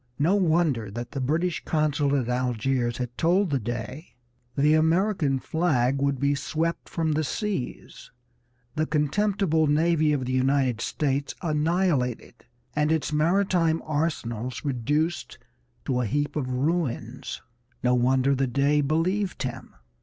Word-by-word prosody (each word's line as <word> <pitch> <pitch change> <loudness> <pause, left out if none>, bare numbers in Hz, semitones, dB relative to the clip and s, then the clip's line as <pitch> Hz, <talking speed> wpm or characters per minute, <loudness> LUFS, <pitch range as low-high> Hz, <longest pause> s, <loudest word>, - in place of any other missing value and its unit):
No 160 +6 +2
wonder 160 - +2
that 120 +4 -6
the 135 - -4
British 165 +6 0
consul 150 -2 +1
at 120 - -3
Algiers 125 0 0
had 125 -1 -4
told 180 +2 +2
the 135 - +1
Dey 120 - -6 0.4
"the 150 +2 +4
American 160 -2 +2
flag 135 -4 0
would 140 -2 +1
be 140 +2 +2
swept 160 +4 -2
from 160 -2 -1
the 155 +1 +1
seas, 190 - -4 0.6
the 155 0 -1
contemptible 160 +1 +1
navy 155 +1 +3
of 140 -3 0
the 130 - -2
United 130 -2 +1
States 140 +2 -1
annihilated, 155 -5 0 0.3
and 150 +1 +2
its 160 -1 0
maritime 165 0 +2
arsenals 130 -6 -2
reduced 145 +6 -1 0.5
to 125 -1 0
a 120 - -1
heap 145 +7 -1
of 135 -4 -2
ruins." 130 -3 -2 0.4
No 125 0 +3
wonder 130 +2 +3
the 135 0 +1
Dey 140 +4 +2
believed 175 +7 0
him. 130 - -6
145 Hz, 135 wpm, -26 LUFS, 130-160 Hz, 0.6 s, the